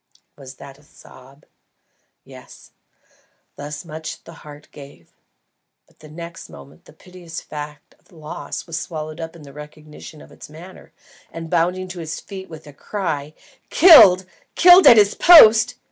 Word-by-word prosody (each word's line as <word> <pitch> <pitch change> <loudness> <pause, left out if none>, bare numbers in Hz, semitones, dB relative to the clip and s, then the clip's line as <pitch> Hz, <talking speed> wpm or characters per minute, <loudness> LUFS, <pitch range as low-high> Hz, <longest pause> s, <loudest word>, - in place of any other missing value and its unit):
Was 135 -2 -14
that 135 +2 -15
a - - -25
sob? 135 0 -20 0.8
Yes; - - -17 0.8
thus 145 +2 -10
much 155 0 -10
the 165 - -15
heart 150 0 -15
gave; 140 - -17 0.7
but 155 - -20
next 170 +1 -12
moment 140 - -17
the - - -19
piteous 175 0 -13
fact 150 -1 -12
of - - -33
loss 155 -3 -10
was 165 -2 -7
swallowed 155 -1 -9
up 160 0 -9
in 165 - -16
the 140 -1 -16
recognition 150 +1 -14
of - - -18
its - - -15
manner, 170 +5 -16 0.4
and, 165 -1 -10
bounding 180 +2 -2
to 180 -1 -10
his 160 -1 -8
feet 190 -2 -12
with 160 -1 -13
the 145 - -16
cry, 155 -4 -7 0.3
"Killed! 195 - +6 0.3
Killed 360 +1 +6
at 235 - +7
his 205 -1 +3
post!" 245 -8 +5
160 Hz, 150 wpm, -18 LUFS, 150-185 Hz, 0.8 s, at